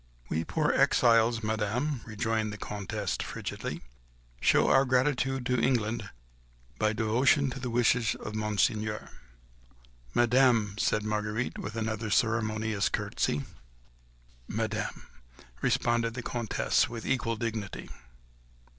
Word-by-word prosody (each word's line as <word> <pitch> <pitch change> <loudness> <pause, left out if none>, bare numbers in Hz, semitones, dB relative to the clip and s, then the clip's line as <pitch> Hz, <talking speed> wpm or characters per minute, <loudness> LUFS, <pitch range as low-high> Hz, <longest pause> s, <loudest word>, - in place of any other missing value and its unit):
"We 80 +1 0
poor - - 0
exiles, 115 -1 +4
Madame," 110 +6 -1
rejoined 110 0 -1
the 105 - -7
Comtesse, 100 -1 -3
frigidly, - - -5 0.6
"show - - +4
our 135 - +5
gratitude 130 0 +1
to 125 -2 +1
England 115 -4 0 0.7
by 110 - +3
devotion 125 +6 +2
to 135 - -6
the 125 -1 -4
wishes 120 -1 +2
of - - -7
Monseigneur." 105 0 -1 1.0
"Madame!" 120 -4 +4
said 105 -2 +1
Marguerite, 105 +2 -2
with 105 +3 -6
another 110 -1 -2
ceremonious 110 -1 +1
curtsey. 75 -1 -1 1.0
"Madame," - - -3 0.6
responded 120 -1 +1
the 125 - -5
Comtesse 120 +4 0
with 115 -2 -7
equal 120 -3 0
dignity. 110 -3 -4
115 Hz, 110 wpm, -29 LUFS, 105-125 Hz, 1.0 s, our